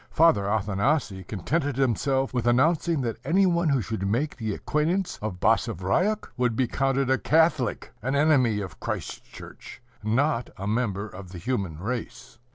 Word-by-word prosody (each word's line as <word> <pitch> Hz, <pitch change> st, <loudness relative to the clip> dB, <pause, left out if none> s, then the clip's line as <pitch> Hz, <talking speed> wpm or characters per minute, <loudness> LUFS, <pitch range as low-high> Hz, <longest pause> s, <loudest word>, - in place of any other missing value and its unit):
Father 160 Hz, -12 st, +4 dB
Athanasii 105 Hz, -, 0 dB
contented 140 Hz, -, -1 dB
himself 135 Hz, +1 st, +1 dB
with 120 Hz, -2 st, -1 dB
announcing 155 Hz, +5 st, +2 dB
that 115 Hz, -3 st, -2 dB
any 190 Hz, +4 st, +3 dB
one 170 Hz, -2 st, +2 dB
who 135 Hz, -5 st, +2 dB
should 100 Hz, -3 st, -3 dB
make 130 Hz, +9 st, 0 dB
the 110 Hz, -3 st, -3 dB
acquaintance 170 Hz, +5 st, -1 dB
of 105 Hz, -4 st, -4 dB
Basavriuk 180 Hz, -, +1 dB
would 125 Hz, -2 st, +1 dB
be 130 Hz, -, +2 dB
counted 135 Hz, +1 st, 0 dB
a 130 Hz, -, +3 dB
Catholic, 155 Hz, -6 st, +1 dB
an 130 Hz, +5 st, -1 dB
enemy 135 Hz, -8 st, +3 dB
of 95 Hz, -4 st, -8 dB
Christ's -, -, -4 dB
church, -, -, -12 dB, 0.2 s
not 120 Hz, +4 st, 0 dB
a 95 Hz, -, -5 dB
member 105 Hz, -2 st, -1 dB
of 95 Hz, -2 st, -11 dB
the -, -, -7 dB
human 95 Hz, -5 st, -2 dB
race. 115 Hz, +4 st, -6 dB
125 Hz, 160 wpm, -26 LUFS, 105-150 Hz, 0.2 s, Father